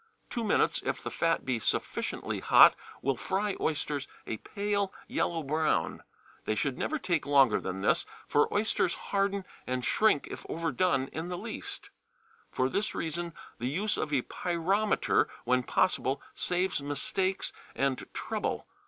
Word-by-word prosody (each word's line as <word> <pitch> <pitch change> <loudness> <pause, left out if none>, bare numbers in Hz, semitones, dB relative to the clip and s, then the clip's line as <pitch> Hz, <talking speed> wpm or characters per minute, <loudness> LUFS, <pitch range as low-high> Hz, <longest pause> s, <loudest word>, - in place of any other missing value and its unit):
Two 235 - -2
minutes, 210 - +2
if - - -2
the - - -4
fat 165 0 +1
be 130 -3 0
sufficiently - - -1
hot, - - +8 0.3
will 135 0 +2
fry 200 +1 -1
oysters 145 -2 -1 0.2
a 110 - -3
pale 200 - -1 0.2
yellow 165 -2 0
brown. 150 - 0 0.4
They 110 - 0
should 135 +4 0
never 310 - -1
take 175 - -1
longer 135 -6 +5
than 95 0 -4
this, 100 - +2 0.2
for 145 - +3
oysters 205 -4 +1
harden 200 -1 -1 0.2
and 125 -1 -1
shrink 215 -10 +3
if - - -7
overdone 165 -4 +1
in 160 +2 -4
the 180 0 -3
least. - - -6 0.6
For 130 - +1
this 200 +10 -1
reason 170 +1 -3 0.2
the 120 - -1
use 195 +8 0
of 155 - -2
a 135 -4 +2
pyrometer, 185 +5 +1
when 125 +1 +3
possible, 135 0 +1
saves 180 -3 0
mistakes 185 +7 -1 0.2
and 135 -1 -1
trouble. - - -2
165 Hz, 145 wpm, -30 LUFS, 135-190 Hz, 0.6 s, hot